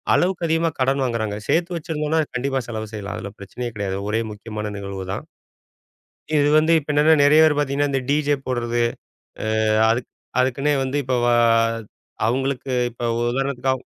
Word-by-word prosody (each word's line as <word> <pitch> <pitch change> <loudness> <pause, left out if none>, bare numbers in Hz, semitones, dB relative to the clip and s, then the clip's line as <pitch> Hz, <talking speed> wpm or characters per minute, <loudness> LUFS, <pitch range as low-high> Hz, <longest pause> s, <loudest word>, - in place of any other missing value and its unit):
அளவுக்கு 180 -1 +1
அதிகமா 165 +1 +1
கடன் 135 +1 +2
வாங்குறாங்க. 110 -4 -2
சேர்த்து 175 +1 +1
வச்சிருந்தோம்னா 160 -1 -1
கண்டிப்பா 135 +2 0
செலவு 110 -2 -4
செய்யலாம். 105 -2 -5
அதுல 100 - -6
பிரச்சனையே 120 +5 -6
கிடையாது. 100 -2 -2
ஒரே 110 +2 +1
முக்கியமான 105 0 -6
நிகழ்வுதான். 95 -1 -5 1.1
இது 145 - +4
வந்து 155 +2 +3
இப்ப 150 0 -4
என்னன்னா, 150 +2 +5
நெறைய 150 +2 +6
பேர் 155 -2 +4
பார்த்தீங்கன்னா, 145 0 +1
இந்த 135 - +1
டிஜே 145 0 +2
போடுறது. 120 -1 -1 0.8
ஆ, - - +2 0.3
அது 115 +2 +2 0.4
அதுக்கு 130 +1 +1 0.2
வந்து 130 +2 -2
இப்ப 130 - -2 0.2
ஆ, - - +4 0.9
அவங்களுக்கு 135 +2 -1 0.2
இப்ப 120 - -13 0.2
ஒரு 120 - 0
உதாரணத்துக்கு 135 0 0
ஆகும் 130 - -7
130 Hz, 155 wpm, -22 LUFS, 115-145 Hz, 1.1 s, நெறைய